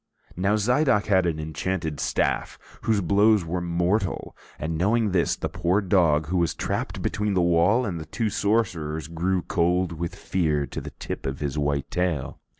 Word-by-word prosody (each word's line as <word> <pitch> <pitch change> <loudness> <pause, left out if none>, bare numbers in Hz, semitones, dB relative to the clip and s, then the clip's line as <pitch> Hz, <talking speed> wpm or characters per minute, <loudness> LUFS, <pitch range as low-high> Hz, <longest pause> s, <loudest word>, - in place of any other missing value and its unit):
Now 95 +4 +1
Zidoc 125 +1 +2
had 95 -3 +3
an 80 -2 -1
enchanted 80 +1 -3
staff - - 0 0.3
whose 110 -3 +2
blows 100 +1 +4
were 90 +2 -2
mortal, 90 +4 -1 0.2
and 80 +2 -3
knowing 105 +5 +2
this, 90 -2 +2
the - - -3
poor 90 +3 +1
dog, 85 -6 +3
who 90 - +1
was 85 -3 +1
trapped - - -3
between 105 -1 -1
the 90 - +3
wall 85 +8 +3
and 90 -6 -3
the 80 - -7
two 115 -3 -2
sorcerers, 90 -9 0
grew 90 +2 -1
cold 90 +1 +1
with 85 +2 -4
fear 80 -7 0
to 65 - -6
the - - -7
tip - - -5
of 65 +1 -4
his 70 -3 -2
white 70 -1 -1
tail. 90 -7 -1
90 Hz, 175 wpm, -25 LUFS, 80-100 Hz, 0.3 s, blows